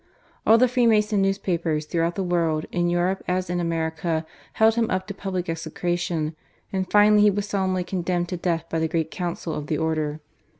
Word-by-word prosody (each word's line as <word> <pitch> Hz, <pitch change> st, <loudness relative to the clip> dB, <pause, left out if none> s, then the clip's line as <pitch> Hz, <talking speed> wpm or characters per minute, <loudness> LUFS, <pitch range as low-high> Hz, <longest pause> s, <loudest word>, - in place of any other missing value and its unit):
All 225 Hz, -, +8 dB
the 255 Hz, +2 st, +5 dB
Freemason 220 Hz, -4 st, +3 dB
newspapers 175 Hz, -5 st, 0 dB
throughout 165 Hz, +2 st, -1 dB
the 195 Hz, -, -1 dB
world. 165 Hz, -3 st, 0 dB
in 175 Hz, 0 st, +1 dB
Europe 175 Hz, +2 st, 0 dB
as 180 Hz, 0 st, -1 dB
in 175 Hz, -, 0 dB
America, 165 Hz, -1 st, -1 dB, 0.3 s
held 220 Hz, 0 st, +4 dB
him 230 Hz, -1 st, 0 dB
up 185 Hz, 0 st, -1 dB
to 200 Hz, -, -6 dB
public 190 Hz, -2 st, -4 dB
execration, 165 Hz, -1 st, -2 dB, 0.4 s
and 190 Hz, -1 st, -1 dB
finally 210 Hz, 0 st, +6 dB
he 210 Hz, -, +6 dB
was 205 Hz, +1 st, -2 dB
solemnly 190 Hz, -2 st, 0 dB
condemned 175 Hz, -1 st, -2 dB
to 180 Hz, -, -3 dB
death 170 Hz, -2 st, -1 dB
by 165 Hz, -, -2 dB
the 160 Hz, -, +1 dB
Great 160 Hz, -1 st, -1 dB
Council 175 Hz, -2 st, -4 dB
of 150 Hz, -1 st, -5 dB
the 155 Hz, -, 0 dB
Order. 155 Hz, -1 st, -1 dB
175 Hz, 185 wpm, -24 LUFS, 165-195 Hz, 0.4 s, All